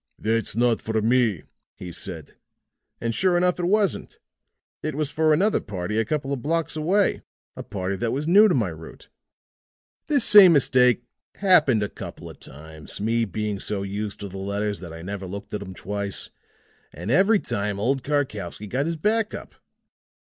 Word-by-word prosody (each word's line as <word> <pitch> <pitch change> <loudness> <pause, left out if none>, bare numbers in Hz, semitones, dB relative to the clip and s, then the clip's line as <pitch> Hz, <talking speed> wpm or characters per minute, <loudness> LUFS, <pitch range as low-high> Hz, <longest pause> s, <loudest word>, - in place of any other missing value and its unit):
"'That's 110 -2 -1
not 120 -1 +2
for 110 0 -1
me,' 115 -5 +2 0.3
he 90 - -8
said. 80 -2 -7 0.7
And 115 0 -2
sure 180 +6 +2
enough 180 0 +1
it 175 - -1
wasn't. 205 +1 0 0.6
It 155 -2 -3
was 150 -1 -2
for 155 +1 +2
another 195 +8 +3
party 100 +1 -3
a 115 - +1
couple 140 +2 -2
of 135 - -4
blocks 165 +3 -1
away 185 +6 +1 0.3
a - - -6
party 95 -1 -4
that 115 +4 -1
was 145 +4 -2
new 205 +5 +7
to 180 - +2
my 110 -8 +1
route. 80 0 -11 1.0
This 285 -6 +3
same 200 -4 +9
mistake 125 -4 +3 0.3
happened 155 - +4
a - - -1
couple - - -9
of - - -17
times 80 +2 -10
me 115 +2 +1
being 105 0 -3
so 100 -1 -3
used 100 +1 -4
to 100 - -5
the 95 0 -8
letters 100 +1 -2
that 85 -3 -9
I 80 0 -9
never 100 0 -5
looked 100 +2 -8
at 105 - -3
'em 95 -2 -8
twice 100 +1 -4 0.6
and 85 +8 -5
every 195 - +5
time 100 - -3
old 130 +6 0
Karkowsky 110 - -2
got 130 +8 -2
his 165 -1 -2
back 215 +5 0
up. - - -10
115 Hz, 180 wpm, -24 LUFS, 100-155 Hz, 1.0 s, same